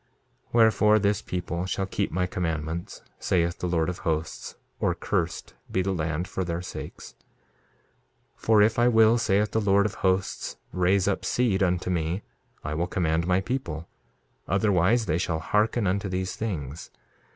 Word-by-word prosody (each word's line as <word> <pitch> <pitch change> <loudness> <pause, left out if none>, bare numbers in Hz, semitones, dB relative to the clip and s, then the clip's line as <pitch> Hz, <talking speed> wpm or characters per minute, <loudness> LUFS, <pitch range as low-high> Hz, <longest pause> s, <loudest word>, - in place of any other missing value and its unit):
2:29 - - -33
Wherefore, 110 -2 +5
this 100 -1 +1
people 90 0 -3
shall 95 +1 -1
keep 95 - -2
my 90 +2 0
commandments, 80 -2 -3 0.2
saith 85 -1 0
the 90 - -2
Lord 85 -2 +1
of 90 -1 -4
Hosts, 80 0 -3 0.2
or - - +1
cursed - - -2 0.2
be 95 - +1
the 95 - -1
land 80 0 -2
for 95 - -3
their 85 0 -3
sakes. 90 - -8
2:30 - - -34 1.1
For 110 -2 +4
if 110 +2 +2
I 120 - +5
will, 115 0 +5
saith 105 -1 +2
the 110 - +1
Lord 100 0 +3
of 105 - -1
Hosts, 95 0 0 0.2
raise 95 +1 +2
up 100 - 0
seed 115 -6 +1
unto 90 -1 +1
me, 85 +3 -1 0.4
I 75 - -3
will 85 +3 -1
command 85 -2 0
my 90 +1 +3
people; 95 -9 -4 0.6
otherwise 100 +3 +3
they 80 -2 0
shall 85 -3 -1
hearken 105 +7 +1
unto 100 +2 0
these 90 0 -2
things. 80 - -4
95 Hz, 165 wpm, -26 LUFS, 85-105 Hz, 1.1 s, Wherefore